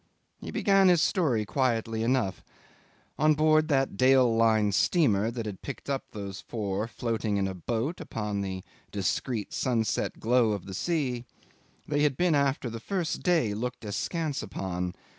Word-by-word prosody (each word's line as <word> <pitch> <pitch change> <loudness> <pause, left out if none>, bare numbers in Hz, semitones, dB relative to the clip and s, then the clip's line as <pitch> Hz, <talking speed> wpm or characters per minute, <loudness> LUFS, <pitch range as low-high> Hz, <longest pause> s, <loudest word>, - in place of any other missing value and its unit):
He - - -7
began 195 -1 +3
his 175 -2 +5
story 140 - +1
quietly 115 -3 0
enough. 115 -6 0 0.8
On 155 +1 +4
board 155 0 +4
that 135 -8 +1
Dale 130 -2 +5
Line 110 -2 +3
steamer 110 - +2
that 115 -1 -4
had 100 -3 -6
picked 140 0 -6
up 135 - -2
these 100 -2 -6
four 105 -1 -3
floating 115 -3 -2
in 100 -1 +1
a 95 - -3
boat 115 - -3
upon 105 -2 -3
the 95 -1 -4 0.3
discreet 105 +3 -2
sunset 115 -5 -1
glow 115 -1 +3
of 100 -4 -5
the 95 - -7
sea, 130 - -1 0.6
they 145 -1 0
had 145 -3 +2
been 175 -2 +3
after 140 -2 +1
the 115 0 -5
first 175 - -2
day 165 - +2
looked 120 +2 -4
askance 150 - -2
upon. 90 -1 -4
115 Hz, 160 wpm, -28 LUFS, 105-145 Hz, 0.8 s, his